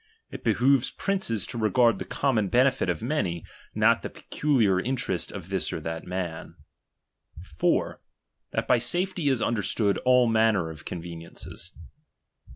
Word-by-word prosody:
It - - -8
behoves 125 +4 +3
princes 185 - -2
lo 120 - -4
regard 110 0 +3
the - - -4
common 115 -8 0
benefit 125 -2 +2
of 85 +1 -2
many, 100 - -1 0.3
not - - +4
the - - -5
peculiar 115 -11 +1
interest 125 -4 -1
of 95 -3 -8
this 95 -2 -2
or - - -3
that 80 +1 -5
man, 90 -3 -5 1.0
4. - - +1 0.5
That - - -2
by 125 - +4
safety 175 +4 0
is 130 -4 +1
understood 105 -2 0
all 125 -1 +4
manner 110 -7 +2
of 75 -1 -12
conveniences. 85 +1 -7
110 Hz, 140 wpm, -26 LUFS, 90-125 Hz, 1.0 s, not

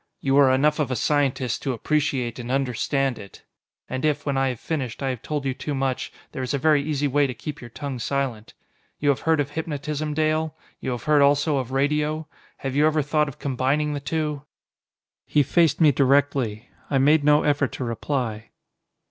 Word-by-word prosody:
You 135 0 +1
are 135 -2 +6
enough 150 +4 +2
of 145 -4 0
a 130 - -1
scientist 135 -4 0
to 135 - -1
appreciate 130 -2 -1
and 120 0 -6
understand 135 0 0
it. 100 -2 -12 0.4
And 130 +2 -4
if, 150 -1 0
when 140 -2 0
I 135 0 +2
have 125 -3 -5
finished, 140 -6 -4
I 135 - 0
have 125 -3 -6
told 150 -2 -3
you 135 - 0
too 145 +2 -4
much, 135 -1 -2 0.2
there - - -5
is 130 +2 -1
a - - +1
very 150 0 +3
easy 145 -1 -1
way 145 +1 +2
to 125 - -5
keep 145 +5 -7
your 120 - -9
tongue 135 +1 -5
silent. 125 -4 -3 0.4
You 145 - +1
have 140 - +2
heard 160 -2 +4
of 145 0 -1
hypnotism, 150 -1 -3
Dale? 155 0 0 0.2
You - - -4
have 120 -3 -3
heard 150 -1 +4
also 145 +1 +3
of 130 -1 -3
radio? 150 +3 0 0.3
Have 135 -1 -4
you 150 +2 +4
ever 155 -1 +1
thought 150 +1 +1
of 140 0 -8
combining 140 +2 0
the 145 - -2
two?" 150 0 -2 0.9
He 145 - +3
faced 165 +4 +2
me 155 -3 +6
directly. 135 -5 +1 0.2
I 140 - +2
made 145 +3 +4
no 150 +1 +5
effort 145 -2 +1
to - - -4
reply. 115 -2 -3
140 Hz, 200 wpm, -24 LUFS, 130-150 Hz, 0.9 s, are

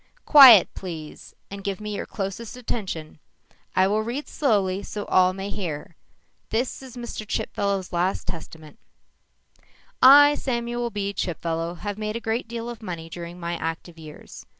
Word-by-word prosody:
"Quiet, 260 - +10
please, 165 -5 -9 0.2
and 200 0 -7
give 200 0 -3
me 210 -1 -5
your - - -5
closest 210 +4 -5
attention. 185 -11 -5 0.6
I 185 - +4
will 210 +2 +1
read 240 +7 -4
slowly 200 - 0
so 205 0 -6
all 185 0 +4
may 195 +2 -6
hear. 165 -4 -5 0.5
This 245 +5 -2
is 255 -2 -11
Mr. 235 -2 -6
Chipfellow's 200 -2 -2
last 175 +2 0
testament: 160 +3 -9 1.2
"_I, 290 +3 +9
Samuel 240 -1 -2
B. 200 -2 -3
Chipfellow, 165 -2 -3
have 205 0 -4
made 215 0 -3
a - - -2
great 230 +1 -2
deal 230 0 -5
of 240 -2 -7
money 170 -5 -7
during 175 +1 -8
my 170 0 -3
active 165 +1 -5
years. 155 -1 -12
200 Hz, 150 wpm, -24 LUFS, 175-230 Hz, 1.2 s, Quiet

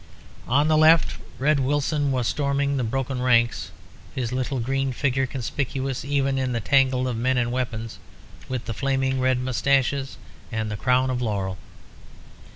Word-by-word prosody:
On 145 +5 +3
the 155 0 +3
left 160 +1 +5 0.2
Red 145 +2 +2
Wilson 145 +1 0
was 125 -3 0
storming 140 -1 0
the 130 - 0
broken 130 +2 -2
ranks, 120 -2 +2 0.5
his 125 -3 -2
little 130 +1 -2
green 135 +2 -1
figure 135 0 0
conspicuous 135 0 -3
even 140 -1 0
in 130 -1 -1
the 115 - 0
tangle 130 +1 +2
of 125 - -2
men 125 +3 +1
and 120 -1 0
weapons, 115 -3 -4 0.5
with 130 -2 -3
the 115 - -3
flaming 135 +2 0
red 130 0 +2
moustaches 135 +2 0 0.3
and 110 -1 -2
the - - -2
crown 130 +4 +2
of 125 -1 -2
laurel. 100 -5 -2
130 Hz, 160 wpm, -24 LUFS, 125-135 Hz, 0.5 s, left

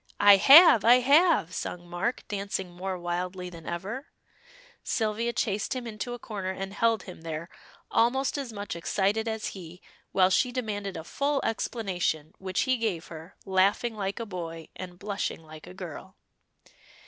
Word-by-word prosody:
"I 205 -1 +8
have! 275 - +9
I 235 +2 +8
have!" 285 - +4
sung 175 -1 -5
Mark, 175 +8 -3
dancing 195 -2 -3
more 185 +1 -4
wildly 180 +1 -4
than 165 -2 -11
ever. 205 - -5 0.8
Sylvia 225 +1 -1
chased 210 0 -1
him 250 -1 -4
into 220 +1 -5
a - - -8
corner 205 -5 -5
and 195 +1 -5
held 225 -1 +1
him 180 - -11
there, 165 +1 -5 0.4
almost 260 +4 +2
as 275 -5 -4
much 205 -3 -5
excited 200 +6 0
as 220 -1 -2
he, 180 -2 -10 0.3
while 185 -1 +4
she 250 +6 +2
demanded 205 -6 -3
a 160 - -6
full 280 - -1
explanation, 185 -9 -2
which 190 -1 -1
he 260 -1 +2
gave 205 -8 -2
her, 160 +1 -10
laughing 195 +4 +2
like 200 +1 -3
a 230 - -3
boy, 165 -5 -7
and 180 -1 -8
blushing 200 -4 -4
like 155 0 -12
a 90 - -10
girl. - - -9
195 Hz, 160 wpm, -28 LUFS, 180-230 Hz, 0.8 s, have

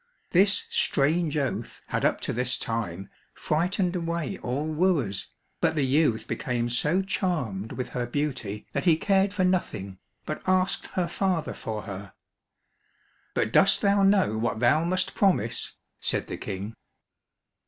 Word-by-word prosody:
This 195 +3 +4
strange 155 +2 +2
oath 140 -3 -3
had - - -1
up - - +2
to - - -2
this 125 +1 +1
time 100 -5 -3 0.3
frightened 180 +3 0
away 170 -3 -2
all 130 +4 -2
wooers, 155 - 0 0.3
but - - +1
the 145 -3 +2
youth 130 -5 +2
became 120 -5 -1
so 150 +10 +1
charmed 130 - -2
with 125 - -4
her 120 -1 -3
beauty 125 -7 -3
that - - -1
he 165 -3 +5
cared 195 +2 +2
for 200 -2 0
nothing, 105 - -1 0.3
but - - -4
asked 185 0 +2
her 180 -2 -1
father 180 -2 -1
for 110 -1 -5
her. 100 -2 -8 1.2
"But 110 - 0
dost 195 0 +5
thou 200 -1 +3
know 195 - +3
what 115 -1 -1
thou 150 +7 +4
must 185 +2 0
promise?" 195 -3 +1 0.3
said - - 0
the - - -6
King. 100 +3 -5
150 Hz, 145 wpm, -27 LUFS, 115-185 Hz, 1.2 s, he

